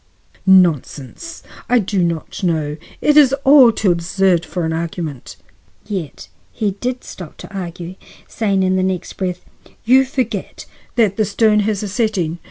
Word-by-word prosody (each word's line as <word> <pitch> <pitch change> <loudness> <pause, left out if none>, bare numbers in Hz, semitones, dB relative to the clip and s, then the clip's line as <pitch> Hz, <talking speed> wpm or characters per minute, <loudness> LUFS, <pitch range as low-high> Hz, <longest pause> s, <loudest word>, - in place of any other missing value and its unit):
"Nonsense! 180 - +1 0.3
I 250 - +4
do 200 -3 0
not 170 -2 -3
know; 160 -5 -1 0.3
it 295 - +3
is 275 -3 +6
all 270 -4 +7
too 215 -4 +1
absurd 175 +1 +1
for 175 -1 -4
argument." 160 -4 -5 0.5
Yet 185 -8 -6 0.2
he 215 -3 -1
did 245 +6 -4
stop 175 -5 -10
to 200 - -11
argue, 175 -1 -6 0.3
saying 200 -4 0
in 185 0 +1
the - - +1
next 185 -1 -2
breath: 180 -2 -4 0.4
"You 260 +3 +5
forget 255 -3 -4 0.3
that 215 -5 +2
the 215 - +2
stone 210 +1 +2
has 210 0 -1
a - - -3
setting. 195 -6 -1
190 Hz, 150 wpm, -18 LUFS, 170-220 Hz, 0.5 s, all